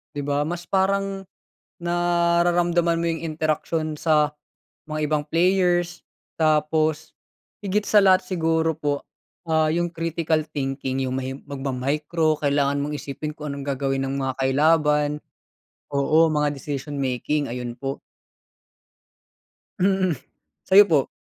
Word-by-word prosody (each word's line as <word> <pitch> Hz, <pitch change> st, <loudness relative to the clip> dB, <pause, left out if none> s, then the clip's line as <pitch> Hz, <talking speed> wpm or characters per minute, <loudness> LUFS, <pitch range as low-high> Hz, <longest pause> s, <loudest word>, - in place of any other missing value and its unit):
'Di 145 Hz, -, -2 dB
ba, 145 Hz, +1 st, 0 dB
mas 175 Hz, +1 st, -4 dB
parang, 195 Hz, 0 st, 0 dB, 0.5 s
nararamdaman 175 Hz, 0 st, +2 dB
mo 170 Hz, -, 0 dB
'yong 165 Hz, 0 st, -3 dB
interaksyon 155 Hz, 0 st, -2 dB
sa 150 Hz, -1 st, +3 dB, 0.6 s
mga 155 Hz, -1 st, -2 dB
ibang 150 Hz, -1 st, +1 dB
players, 175 Hz, +1 st, +1 dB, 0.3 s
tapos, 155 Hz, 0 st, +1 dB, 0.5 s
higit 205 Hz, +2 st, 0 dB
sa 210 Hz, -, +5 dB
lahat 190 Hz, -1 st, +5 dB
siguro 160 Hz, -3 st, 0 dB
po, 145 Hz, -2 st, -1 dB, 0.5 s
ah, 160 Hz, -1 st, +3 dB
'yong 175 Hz, +1 st, 0 dB
critical 165 Hz, -2 st, -1 dB
thinking, 135 Hz, -3 st, -3 dB
'yong 130 Hz, -, -2 dB
may 130 Hz, 0 st, -3 dB
magma-micro, 145 Hz, +4 st, -1 dB
kailangan 140 Hz, -1 st, +1 dB
mong 150 Hz, -, -4 dB
isipin 150 Hz, +2 st, -6 dB
kung 150 Hz, -1 st, -6 dB
anong 140 Hz, -1 st, -6 dB
gagawin 135 Hz, -1 st, -1 dB
ng 135 Hz, -, -3 dB
mga 135 Hz, 0 st, -1 dB
kalaban, 150 Hz, +2 st, +3 dB, 0.8 s
oo, 155 Hz, +4 st, +4 dB
mga 150 Hz, -1 st, +1 dB
decision-making, 140 Hz, 0 st, -2 dB
ayun 120 Hz, 0 st, -4 dB
po. 135 Hz, 0 st, -3 dB, 1.8 s
Mm, 190 Hz, -4 st, +2 dB, 0.5 s
sa'yo 200 Hz, +2 st, +8 dB
po? 145 Hz, -5 st, +3 dB
155 Hz, 120 wpm, -23 LUFS, 140-170 Hz, 1.8 s, sa'yo